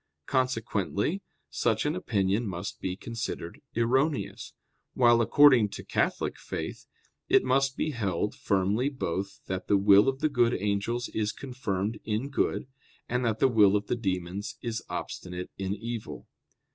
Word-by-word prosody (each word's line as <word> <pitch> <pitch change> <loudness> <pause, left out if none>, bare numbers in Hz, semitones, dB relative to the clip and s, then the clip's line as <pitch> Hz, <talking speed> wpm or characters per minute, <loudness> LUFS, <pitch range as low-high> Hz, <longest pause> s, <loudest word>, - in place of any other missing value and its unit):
Consequently 125 - 0 0.3
such 110 - +1
an 150 +2 0
opinion 105 - 0
must 90 0 -5
be 90 -1 -2
considered 110 -5 -5
erroneous; 130 +6 0 0.4
while 120 -2 +5
according 130 -3 +6
to - - -8
Catholic - - -1
Faith, - - -6 0.4
it - - +5
must 135 +1 +2
be 155 - 0
held 105 - -1
firmly 100 +7 +1
both 100 - -4
that 95 0 -4
the 100 - +4
will 100 +4 +6
of 135 - -2
the 155 - +2
good 120 -4 +3
angels 105 +4 -1
is 105 -1 -1
confirmed 110 -6 -3
in 110 +5 -2
good, 140 - 0 0.4
and 125 +1 0
that 115 -2 +1
the - - +4
will 105 -5 +5
of 105 0 0
the - - -1
demons 95 -2 -3
is 115 -2 -2
obstinate 90 0 -5
in 95 +1 -1
evil. 115 +1 -6
110 Hz, 145 wpm, -28 LUFS, 100-125 Hz, 0.4 s, according